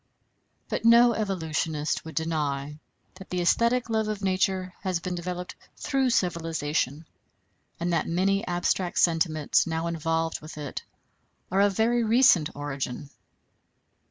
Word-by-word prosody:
But - - -3
no 235 +1 +6
evolutionist 160 -7 -2
would 160 - -9
deny 150 -3 -2 0.3
that 190 0 -13
the 180 - -2
æsthetic 235 +8 +2
love 220 -1 0
of 210 -1 -4
nature 185 -1 0
has 185 -3 -1
been 180 +1 -4
developed 180 +1 -5 0.2
through 270 -2 0
civilization, 160 - -1 0.7
and 170 +1 -1
that 165 - 0
many 195 +4 +1
abstract 175 +1 -1
sentiments 160 -3 +2
now 160 0 -2
involved 165 0 -1
with 155 0 -10
it 145 -3 -5 0.7
are 195 +1 +3
of 200 -1 +2
very 235 +2 +2
recent 220 - +5
origin. 140 -1 -5
175 Hz, 130 wpm, -26 LUFS, 160-195 Hz, 0.7 s, no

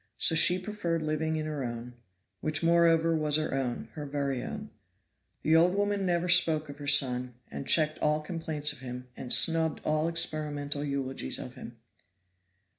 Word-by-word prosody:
So - - +2
she 160 +3 +5
preferred 180 -4 -3
living 155 +1 -1
in 155 -1 -2
her 150 -3 -3
own, 120 0 -6 0.5
which 155 +1 -1
moreover 165 -1 +4
was 150 -2 +1
her 155 -2 0
own 130 -3 -3
her 150 -2 -6
very 140 -2 -2
own. - - -7 0.7
The 160 - +3
old 175 +3 +4
woman 205 -1 0
never 175 0 +1
spoke 160 -4 +3
of 140 +1 -9
her 145 - -7
son, 125 -3 +3 0.2
and 135 - -6
checked 155 -1 +3
all 150 0 +2
complaints 155 -3 -2
of 140 - -12
him, 125 -1 -8
and 125 - -7
snubbed 165 -1 +3
all 155 +1 +1
experimental 150 -3 -1
eulogies 140 -2 -2
of 130 -3 -7
him. 120 -2 -10
155 Hz, 170 wpm, -29 LUFS, 140-165 Hz, 0.7 s, she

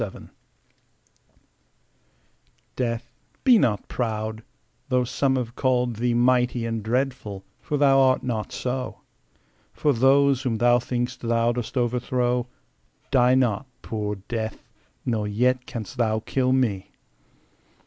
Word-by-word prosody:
Death 105 -4 -6 2.5
DEATH, 115 -2 -3 0.3
be 250 -5 +6
not 105 - 0
proud, 110 -2 -3 0.5
though 125 -1 +2
some 130 +2 0
have 120 -2 -3
called 125 -3 +1
thee 120 +1 +1
Mighty 125 -1 +2
and 115 -1 -2
dreadful, 110 -4 -2
for 150 - -2
thou 135 -1 +5
art 130 -1 +3
not 115 -4 -3
so: 125 0 -4 0.7
For 145 - +1
those 135 +2 +4
whom 125 -4 -1
thou 120 +2 +4
think'st 125 +1 -3
thou 115 0 +2
dost 120 +2 -4
overthrow 125 0 0 0.6
Die 125 -1 +5
not, 125 -1 +1 0.2
poor 105 -2 -3
Death; 110 -2 -4 0.4
nor 110 -4 0
yet 125 +5 +1
canst 120 -4 -7
thou 110 -2 +1
kill 130 +2 0
me. 115 -8 0
125 Hz, 120 wpm, -24 LUFS, 115-130 Hz, 2.5 s, be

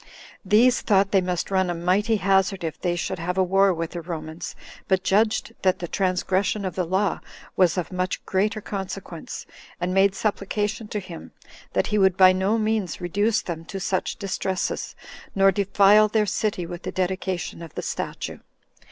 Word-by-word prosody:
These 230 +5 +4
thought 195 -2 +3
they 195 - +4
must 180 0 -2
run 190 -1 +2
a 175 - -1
mighty 190 +6 +1
hazard 195 -2 +2
if 160 -2 -4
they 175 -1 0
should 175 - -3
have 180 +2 -3
a 190 - +4
war 195 +2 +4
with 165 -2 -3
the 175 - -5
Romans, 160 -1 -6 0.3
but 190 -1 +2
judged 215 +3 +1
that 185 -1 +2
the 175 - -5
transgression 190 +2 0
of 185 - -3
the 180 +1 -1
law 190 +4 0 0.4
was 180 -1 +3
of 180 - -2
much 185 0 -2
greater 210 +3 0
consequence, 190 -4 -6 0.3
and 175 +1 -1
made 195 0 +4
supplication 210 +1 -2
to 210 - -3
him, 180 -4 -10 0.4
that - - +2
he 210 - +3
would 190 -2 +4
by 185 -1 +7
no 190 +4 +1
means 215 -5 -1
reduce 205 +5 0
them 165 -2 -5
to 195 +3 -6
such 190 -1 -1
distresses, 190 -1 -3 0.4
nor 195 0 +5
defile 200 +1 +5
their 215 0 +1
city 200 -2 -1
with 175 +1 -7
the - - -5
dedication 185 -2 -2
of 165 -2 -10
the - - -4
statue. - - -4
190 Hz, 180 wpm, -24 LUFS, 180-205 Hz, 0.4 s, by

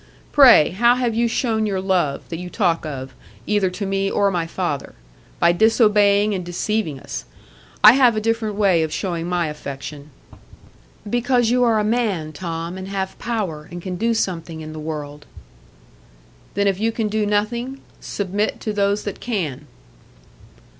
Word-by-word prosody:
Pray, 255 - +7
how 235 +6 +4
have 245 -2 0
you 235 +1 +2
shown 225 -2 0
your 195 -2 -1
love, 180 -7 0
that 165 - -5
you 180 0 -6
talk 175 -6 0
of, 135 -3 -6 0.3
either 205 -3 +1
to 200 +3 -5
me 195 0 0
or 200 0 +2
my 170 -3 -1
father? 165 -5 -3 0.4
By 170 - +5
disobeying 210 0 +4
and 185 -2 -3
deceiving 175 -3 -2
us. - - -7 0.6
I 215 - +11
have 250 -3 +4
a - - +1
different 225 -1 -1
way 195 -5 +3
of 160 -1 -1
showing 170 -2 -3
my 175 -1 0
affection." 145 -1 -7 1.0
"Because 240 +1 +1
you 250 0 +3
are 230 -2 +3
a 210 - +1
man, 210 -9 -1
Tom, 170 +2 -5
and 190 - -7
have 195 -1 -4
power, 190 -10 -3
and 175 - -6
can 180 +1 -5
do 230 +5 0
something 165 -6 -3
in 155 0 -8
the 155 - -7
world." 150 -2 -6 1.3
"Then, 200 +1 +1
if 195 -1 +1
you 225 +2 +1
can 225 -1 -2
do 210 0 -1
nothing, 235 +6 -1 0.2
submit 205 +2 -2
to 215 - -3
those 200 0 +1
that 205 - -5
can." 155 - -3
195 Hz, 165 wpm, -21 LUFS, 165-220 Hz, 1.3 s, I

